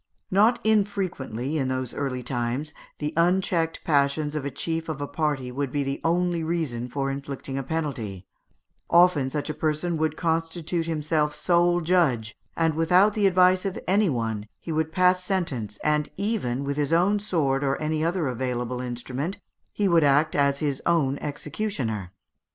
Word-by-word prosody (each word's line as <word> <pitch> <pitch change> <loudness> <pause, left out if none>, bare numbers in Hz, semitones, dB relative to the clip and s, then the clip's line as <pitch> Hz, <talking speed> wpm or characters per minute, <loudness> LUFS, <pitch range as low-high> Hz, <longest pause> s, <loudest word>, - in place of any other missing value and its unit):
Not 220 +5 +4
unfrequently, 185 - 0
in 135 - 0
those 130 -2 -2
early 130 -3 -3
times, 125 +4 -2 0.2
the 150 0 -3
unchecked 170 -1 +1
passions 145 0 +1
of 150 -2 -2
a 140 - -2
chief 160 +4 -3
of 155 -2 -3
a 145 - -2
party 145 -4 -2
would 135 0 -3
be 145 0 0
the 135 0 -3
only 175 0 +1
reason 155 -8 -2
for 135 +2 -2
inflicting 140 -1 -5
a 135 - -1
penalty; 130 - -4 0.6
often 170 -6 +5
such 145 +1 -3
a 155 - -2
person 160 +2 -1
would 155 0 -1
constitute 165 0 -1
himself 155 -1 0
sole 175 0 +2
judge, 150 -11 +1 0.2
and, 165 -1 +2
without 180 +6 +4
the 205 -2 +3
advice 185 0 +4
of 195 -2 -3
any 200 +1 +3
one, 115 -5 -2
he 165 - -6
would 160 0 0
pass 180 +1 +3
sentence, 135 - -2
and 150 0 +1
even, 190 - -1
with 140 0 -3
his 145 0 0
own 185 +5 +3
sword 145 -9 0
or 135 0 0
any 155 0 -1
other 170 0 0
available 125 0 -2
instrument, 125 +7 -4 0.3
he 205 - 0
would 170 -3 +4
act 145 +2 +3
as 140 -1 +2
his 140 -2 -2
own 145 -5 +2
executioner. 145 - -3
155 Hz, 165 wpm, -25 LUFS, 135-175 Hz, 0.6 s, often